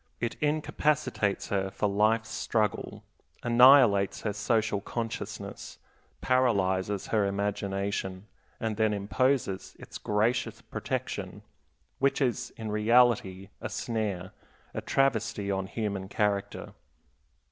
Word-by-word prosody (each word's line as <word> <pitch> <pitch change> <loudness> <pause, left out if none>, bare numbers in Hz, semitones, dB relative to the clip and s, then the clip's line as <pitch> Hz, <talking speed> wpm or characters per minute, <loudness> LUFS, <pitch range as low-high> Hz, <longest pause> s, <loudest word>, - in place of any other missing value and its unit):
It 120 -1 -1
incapacitates 150 -7 0
her 95 -1 0
for 105 - -1
life's 110 +3 +2
struggle, 110 -3 -1 0.4
annihilates 120 -5 +6
her 105 - -2
social 110 -1 0
consciousness, 115 +1 -5 0.4
paralyzes 100 -6 +1
her 105 -3 +2
imagination, 100 -1 -2 0.3
and 110 -2 -2
then 110 -1 +2
imposes 100 +1 0
its - - -10
gracious 110 +4 0
protection, - - -5 0.6
which 140 0 +2
is 125 -2 0
in 110 -2 -5
reality 105 -4 +3
a - - -4
snare, 105 -6 -3 0.4
a - - -3
travesty 115 -6 0
on 95 -1 -2
human 100 -2 -3
character. 100 -2 -1
105 Hz, 105 wpm, -29 LUFS, 100-120 Hz, 0.6 s, annihilates